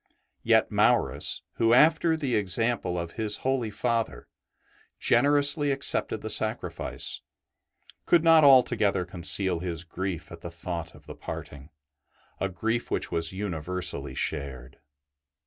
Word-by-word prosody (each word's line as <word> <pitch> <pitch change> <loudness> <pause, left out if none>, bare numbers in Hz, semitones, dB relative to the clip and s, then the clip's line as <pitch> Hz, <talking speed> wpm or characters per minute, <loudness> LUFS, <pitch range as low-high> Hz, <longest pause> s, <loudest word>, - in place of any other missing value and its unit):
Yet - - +3
Maurus, 70 +2 +1
who, 115 +1 +4
after 160 +3 +4
the 140 -6 -1
example 105 -1 0
of 85 -1 -4
his 110 -2 -2
holy 130 -4 0
Father, 115 - -2 0.7
generously 145 +1 +3
accepted 140 0 0
the - - -5
sacrifice, - - -3 0.9
could 170 -2 +4
not 165 -1 +6
altogether 120 -8 +4
conceal 90 +1 0
his 85 -2 -4
grief 90 -1 -5
at 85 0 -10
the 85 - -7
thought 85 0 -6
of - - -17
the - - -9
parting, 70 +1 -9 0.7
a 95 - -1
grief 115 +6 -2
which - - -3
was 85 -1 0
universally 90 -2 -3
shared. 65 -2 -5
100 Hz, 125 wpm, -27 LUFS, 85-125 Hz, 0.9 s, not